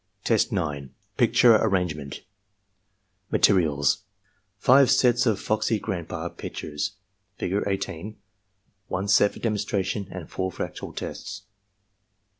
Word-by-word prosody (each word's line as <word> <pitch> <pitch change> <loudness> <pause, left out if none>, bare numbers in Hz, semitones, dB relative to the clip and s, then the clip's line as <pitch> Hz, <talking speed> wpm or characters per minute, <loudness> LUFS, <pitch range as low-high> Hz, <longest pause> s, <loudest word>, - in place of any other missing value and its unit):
Test 115 +1 +2
9. 75 - -3
— - - -43
^Picture 115 -3 +5
Arrangement 90 -9 -1 1.1
Materials, 75 -7 +3 0.3
— 95 +1 -44
Five 130 +6 +5
sets 125 -2 +4
of 110 -3 +2
"Foxy 110 +1 0
Grandpa" 90 -4 -4
pictures, 75 -1 -5 0.4
Figure 95 +3 -1
18, 95 +1 -4 0.7
one 95 +2 -2
set 100 0 +4
for - - -11
demonstration, 100 -3 -1
and 90 -4 -7
four 95 0 -3
for - - -4
actual - - -7
tests. 95 0 -7
95 Hz, 115 wpm, -25 LUFS, 85-110 Hz, 1.1 s, ^Picture